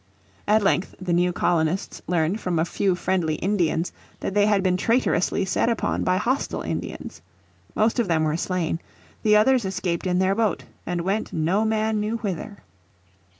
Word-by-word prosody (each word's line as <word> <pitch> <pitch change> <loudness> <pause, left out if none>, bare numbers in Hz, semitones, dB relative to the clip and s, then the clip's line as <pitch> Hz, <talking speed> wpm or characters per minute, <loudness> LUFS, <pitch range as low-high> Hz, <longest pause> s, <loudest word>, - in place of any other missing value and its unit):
At 210 +1 +4
length 195 -1 +1
the 185 -2 -2
new 175 +1 +3
colonists 170 +1 0
learned 175 +3 +1
from 180 -2 -1
a 160 - +2
few 190 +1 0
friendly 180 -4 0
Indians 175 -2 0 0.3
that - - -3
they 205 0 +4
had 205 -2 +2
been 185 -1 +2
traitorously 225 -2 +1
set 190 - +1
upon 230 - 0
by 185 0 +2
hostile 250 +8 -1
Indians. - - -5 0.5
Most 220 +3 +2
of 235 - +1
them 160 -2 +2
were 155 0 +1
slain; 170 -1 -1 0.4
the 210 -1 +4
others 250 +3 +4
escaped 185 -2 -2
in 180 0 +1
their 190 +1 +3
boat 215 -3 0 0.2
and 175 -1 -1
went 195 +5 -1
no 175 +7 +1
man 220 0 +1
knew 215 +2 -1
whither. 200 -1 -5
190 Hz, 170 wpm, -24 LUFS, 175-215 Hz, 0.5 s, At